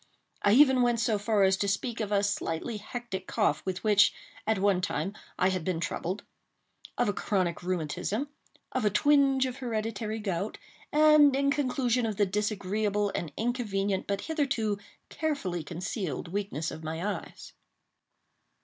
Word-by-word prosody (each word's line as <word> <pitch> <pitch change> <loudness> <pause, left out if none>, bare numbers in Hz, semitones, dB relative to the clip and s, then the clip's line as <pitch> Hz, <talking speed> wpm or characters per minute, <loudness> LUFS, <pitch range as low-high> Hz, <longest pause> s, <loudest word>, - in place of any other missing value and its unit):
I 205 - +4
even 265 0 +6
went 240 -1 +2
so 220 -2 +1
far 210 -1 +2
as 190 0 +5
to 200 - 0
speak 230 +4 -1
of 210 -2 -2
a 200 -1 +3
slightly 200 +1 -2
hectic 210 -3 -6
cough 150 - +1
with 185 0 -3
which, 210 -1 +5 0.4
at 220 -1 +2
one 195 -1 +2
time, 195 +2 -2 0.2
I 185 - +3
had 185 -3 -2
been 175 -1 -1
troubled—of 190 +7 -5
a 205 - +1
chronic 185 -6 -1
rheumatism—of 185 - -4
a 210 - +4
twinge 270 +3 +4
of 255 0 -4
hereditary 220 -3 -3
gout—and, 280 - +2
in 280 0 +2
conclusion, 255 -4 +1
of 215 - -2
the 205 - +4
disagreeable 205 0 0
and 165 -4 -3
inconvenient, 205 -5 -1
but 200 0 -1
hitherto 265 -10 -1 0.3
carefully 205 - -2
concealed, 175 - -4
weakness 190 -5 -3
of 160 - -8
my 160 +6 -2
eyes. - - -13
210 Hz, 145 wpm, -29 LUFS, 190-245 Hz, 0.4 s, even